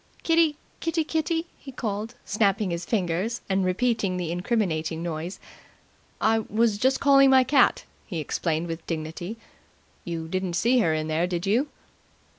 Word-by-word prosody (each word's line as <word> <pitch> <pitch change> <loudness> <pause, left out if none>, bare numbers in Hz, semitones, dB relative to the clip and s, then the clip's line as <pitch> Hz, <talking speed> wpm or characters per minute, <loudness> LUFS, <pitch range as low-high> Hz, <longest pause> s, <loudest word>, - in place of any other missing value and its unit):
"Kitty, 330 -2 +3 0.2
Kitty, 330 -1 0
Kitty!" 325 +1 -1
he 270 - -10
called, 220 -1 -4
snapping 200 -2 +1
his 170 0 -3
fingers, 195 +3 -1
and 190 0 +1
repeating 195 0 0
the 175 -2 -3
incriminating 170 -4 -1
noise. 170 +2 -4 0.8
"I 225 0 +3
was 220 -1 +1
just 260 +4 +2
calling 275 -1 +6
my 260 -1 +6
cat," 260 0 +3 0.2
he 180 - -4
explained 160 +1 -1
with 165 -1 -5
dignity. 165 +6 -4 0.7
"You 165 -1 -4
didn't 185 0 -2
see 240 +8 +3
her 165 -8 +3
in 155 0 -2
there, 160 +3 +1
did 175 0 -3
you?" 235 +9 +2
200 Hz, 150 wpm, -26 LUFS, 170-245 Hz, 0.8 s, calling